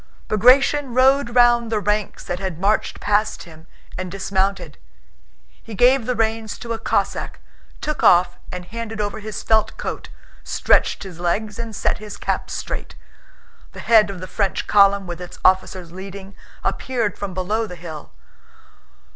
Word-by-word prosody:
Bagratión 255 +4 +4
rode 260 -1 +3
round 240 -2 +4
the 215 - +1
ranks 210 0 -1
that 175 - -4
had 190 -4 -4
marched 200 +5 0
past 210 +1 0
him 160 -1 -15 0.3
and 185 -1 -4
dismounted. 190 -4 -2 0.8
He 225 - -9
gave 250 +2 +4
the 250 - 0
reins 220 -1 -1
to 235 -1 -5
a 225 - -5
Cossack, - - -1 0.4
took 305 0 -3
off 175 0 +4
and 180 -1 -6
handed 225 +2 -6
over 205 0 -2
his 215 0 -6
felt 220 -1 +2
coat, - - -5 0.3
stretched - - +2
his 180 -4 -10
legs, 205 +5 -1
and 230 -2 -5
set - - 0
his 210 -1 -8
cap - - -2
straight. - - -5 0.8
The - - -10
head 220 -3 +5
of 190 -3 -7
the - - -5
French 195 0 -1
column, 200 -1 +4
with 175 0 -6
its 180 - -9
officers 185 -2 +2
leading, 195 +1 -9 0.3
appeared 235 -6 -1
from 195 -3 -6
below 210 +5 -1
the 180 - -8
hill. 165 -3 -9
205 Hz, 155 wpm, -21 LUFS, 185-225 Hz, 0.8 s, head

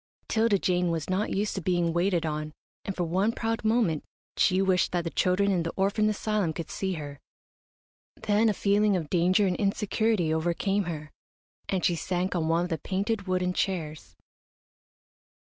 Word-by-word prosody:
'Tilda 220 -2 +3
Jane 180 -1 +1
was 165 +1 -2
not 195 +3 0
used 205 +2 -1
to 190 - -3
being 175 -1 +1
waited 175 -1 +1
on, 155 0 -3 0.3
and 195 - -4
for 180 - -1
one 185 +6 +1
proud 225 -1 -2
moment 215 -9 +1 0.3
she 185 -1 +3
wished 190 -2 +2
that 175 -1 0
the 165 - -4
children 195 +2 +2
in 180 -3 +1
the 165 0 -3
orphan 200 +2 +2
asylum 210 -5 -1
could 165 0 -6
see 190 -1 -2
her. 145 -4 -7 1.0
Then 215 +2 +2
a - - +2
feeling 205 +1 +2
of 160 -4 -5
danger 185 +3 +3
and 185 -2 +1
insecurity 200 -3 +1
overcame 175 +5 0
her, 155 -3 -6 0.6
and 190 -2 0
she 175 - +3
sank 180 +2 -2
on 165 -2 0
one 165 +1 +2
of 175 - -4
the 160 - -1
painted, 200 +4 -2
wooden 180 0 0
chairs. 155 - -3
185 Hz, 175 wpm, -27 LUFS, 165-200 Hz, 1.0 s, Tilda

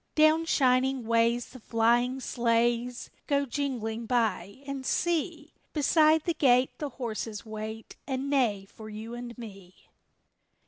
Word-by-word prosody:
Down 310 +1 +5
shining 260 -3 +2
ways 230 +1 +2
the 255 - -12
flying 240 +3 +2
sleighs 240 0 0 0.2
Go 280 -1 +2
jingling 235 -4 -3
by, 225 -1 -1
and 275 -1 -5
see! 325 0 -1 0.2
Beside 310 +1 +4
the 340 - 0
gate 255 -4 +3
the 295 - -3
horses 225 -4 -5
wait 220 0 -7
And 265 0 -2
neigh 235 -9 +1
for 215 +2 -12
you 220 +2 -7
and 240 0 -7
me! 195 -6 -12
245 Hz, 130 wpm, -28 LUFS, 225-280 Hz, 0.2 s, Down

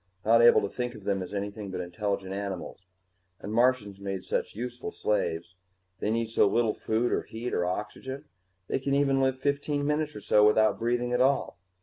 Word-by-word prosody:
Not 115 +2 +6
able 120 - +7
to - - -1
think 125 +3 -4
of - - -11
them 100 -1 0
as 90 - -6
anything 100 0 -4
but 95 - -4
intelligent 95 +2 -3
animals. 95 -2 -5 0.5
And 105 - -6
Martians 115 -5 +2
made 95 -1 -4
such - - -2
useful 120 +2 -5
slaves 85 -5 -1 0.5
they - - -1
need 115 0 -1
so 105 - +4
little 115 +1 +2
food 115 +2 0
or - - +1
heat 120 +2 -6
or 90 - +1
oxygen, 130 +9 -5 0.4
they - - -1
can 140 +1 0
even 135 -1 +3
live 130 0 +2
fifteen 145 +1 -1
minutes 150 +1 0
or 105 - -7
so 105 +1 +4
without 110 +1 +4
breathing 120 +1 0
at 125 - +2
all. 135 -7 +1
110 Hz, 195 wpm, -28 LUFS, 100-130 Hz, 0.5 s, able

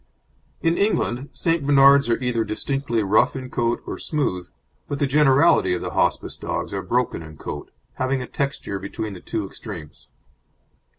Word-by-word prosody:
In 165 +1 +2
England 140 - 0
St. 165 -3 0
Bernards 140 -1 +6
are 115 - +3
either 120 -2 +1
distinctly 115 +2 -1
rough 100 +7 +3
in 130 -1 -6
coat 120 -2 0
or - - -5
smooth, 90 - -2 0.4
but 145 - -3
the 145 - +1
generality 135 -9 +4
of 90 - -4
the - - -4
Hospice - - 0
dogs - - -4
are - - -2
broken 125 -7 0
in 80 -1 -11
coat, 75 - -6 0.3
having 130 +1 0
a 125 - -4
texture 135 -8 -3
between 100 +2 -5
the 90 - -9
two 110 +2 -3
extremes. 90 -7 -9
125 Hz, 165 wpm, -23 LUFS, 105-140 Hz, 0.4 s, Bernards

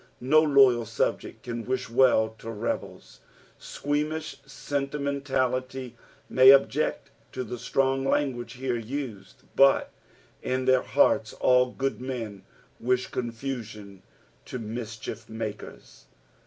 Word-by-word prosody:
No 150 +5 +4
loyal 135 -6 +4
subject 115 - -2
can 120 -1 -5
wish 130 +1 -2
well 115 -2 +4
to 115 - -8
rebels. 115 +1 -5 0.4
Squeamish 150 +2 -3
sentimentality 135 -3 -2 0.3
may 130 +1 +8
abject 140 0 +2 0.2
to 130 - -3
the 125 0 -7
strong 135 +1 0
language 135 -3 -1
here 125 -1 -2
used, 115 -5 -7
but 135 0 +4 0.5
in 130 0 -1
their 130 -1 +4
hearts - - +2
all 125 0 +3
good 135 +1 -3
men 115 -6 -5 0.4
wish 125 +1 0
confusion 115 -5 -6 0.4
to - - -6
mischiermakers. 110 -1 -7
130 Hz, 105 wpm, -27 LUFS, 115-135 Hz, 0.5 s, may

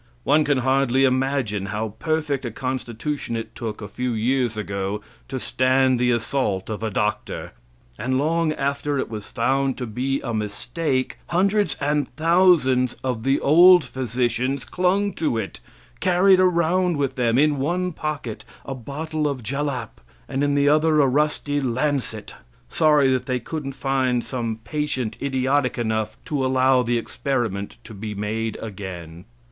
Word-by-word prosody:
One 155 - +4
can 145 -1 +2
hardly 130 0 +2
imagine 130 -6 +1
how 105 +3 -2
perfect 155 -4 -1
a 120 - -2
constitution 130 +2 -3
it 115 0 -5
took 110 -2 -5
a - - -5
few 125 +4 -3
years 120 0 0
ago 100 0 -3 0.3
to 130 - -4
stand 130 0 +2
the 125 0 +2
assault 115 -4 0
of 110 - -4
a 110 - -1
doctor. 105 +1 -2 0.5
And 130 +1 0
long 160 +3 +1
after 140 0 -1
it 130 - -2
was 105 -2 -6
found 135 +3 0
to 125 - -3
be 130 +5 -1
a 120 - -4
mistake, 120 +6 -2
hundreds 200 +4 +2
and 145 -1 0
thousands 155 -7 +4
of 125 -4 -2
the 135 +2 +2
old 175 +4 +7
physicians 125 +1 -1
clung 195 +2 +1
to 150 -8 +1
it, 110 -3 -4 0.4
carried 185 +1 +4
around 180 -1 +2
with 140 -2 0
them, 120 -2 +1
in 145 0 +3
one 180 +6 0
pocket, 150 -8 -4 0.2
a 135 - -4
bottle 150 +4 -3
of 135 -4 -3
jalap, 140 - -3 0.3
and 135 +2 -1
in 145 0 +2
the 140 0 +3
other 155 +1 +4
a 145 - +6
rusty 145 +1 0
lancet, 130 -4 -2 0.4
sorry 150 -4 +4
that 130 -1 -1
they 130 -1 0
couldn't 135 +2 -5
find 130 -2 0
some 115 -3 -4
patient 140 -5 -2
idiotic 135 0 +1
enough 110 -2 -1
to 145 -4 -1
allow 130 0 +3
the 120 0 0
experiment 115 -5 -2
to 110 - -11
be 105 +1 -6
made 110 +2 -2
again. 90 -5 -7
130 Hz, 155 wpm, -23 LUFS, 115-150 Hz, 0.5 s, old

